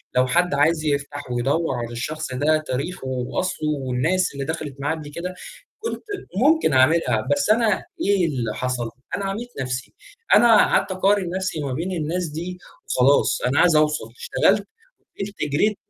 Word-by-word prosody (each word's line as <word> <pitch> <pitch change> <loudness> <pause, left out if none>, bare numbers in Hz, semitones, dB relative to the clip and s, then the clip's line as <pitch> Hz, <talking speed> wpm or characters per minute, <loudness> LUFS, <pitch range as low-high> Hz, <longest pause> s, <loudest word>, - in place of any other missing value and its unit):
لو 130 0 +4
حد 175 +3 +2
عايز 155 +2 +2
يفتح 145 -2 -2
ويدوّر 135 +5 0
على 120 -1 -4
الشخص 130 +4 -4
ده 150 +4 +2
تاريخُه 135 +3 -3
وأصلُه 130 +5 -2 0.2
والناس 160 +8 +1
اللي 140 0 -4
دَخَلت 155 -3 -4
معاه 145 +3 -1
قبل 150 -2 -8
كده، 180 +4 -5 0.5
كنت 455 +1 -4 0.3
ممكن 290 - +3
أعملها، 130 -4 +3
بس 145 +8 -1
أنا 220 -2 +3 0.2
إيه 195 -2 +3
اللي 120 -8 -2
حصل؟ 125 -2 -2 0.3
أنا 200 - -3
عَميت 215 +5 -4
نفْسي، 125 -1 -4 0.4
أنا 235 -2 +7
قعدت 205 - +3
أقارن 190 0 +2
نفْسي 185 -4 -2
ما 140 -3 -3
بين 170 +7 -3
الناس 175 +1 -2
دي 170 +4 -6 0.3
وخلاص، 135 +3 +3
أنا 125 +3 +1
عايز 175 -3 +5
أوصل، 150 0 +2
اشتغلت 480 - +2 0.5
وفضلت 200 0 -5 0.2
جريت 205 +8 +2
155 Hz, 160 wpm, -22 LUFS, 130-185 Hz, 0.5 s, أنا